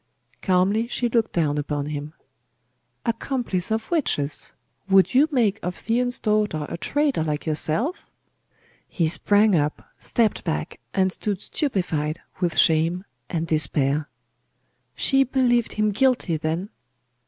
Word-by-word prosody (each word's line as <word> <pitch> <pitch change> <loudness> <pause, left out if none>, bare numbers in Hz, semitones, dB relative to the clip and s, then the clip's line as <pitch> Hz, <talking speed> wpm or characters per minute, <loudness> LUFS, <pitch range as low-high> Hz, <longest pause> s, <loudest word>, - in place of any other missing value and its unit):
Calmly 195 +4 +2
she 240 0 -1
looked 225 -1 +1
down 150 -4 0
upon 145 0 -2
him. 150 0 -5 0.9
'Accomplice 230 -6 -1
of 220 +5 -2
witches! 150 - 0 0.4
Would 195 +3 +5
you 275 +4 +5
make 220 -6 +2
of 180 0 -3
Theon's 245 +2 0
daughter 210 -8 0
a - - -5
traitor 285 - 0
like 150 -1 -3
yourself?' 165 - -1 0.8
He 165 -4 0
sprang 205 +4 +3
up, 150 -1 -1
stepped 225 -3 0
back, 75 0 -3 0.2
and 190 -1 +2
stood 200 0 -2
stupefied 170 - -2 0.2
with 175 -3 -1
shame 165 +4 +3 0.2
and 165 -1 -2
despair.... 150 -2 +1 0.9
She 270 0 +3
believed 245 -3 +1
him 215 0 +1
guilty, 245 -6 +1
then!.... 160 +5 -2
190 Hz, 125 wpm, -23 LUFS, 155-235 Hz, 0.9 s, Would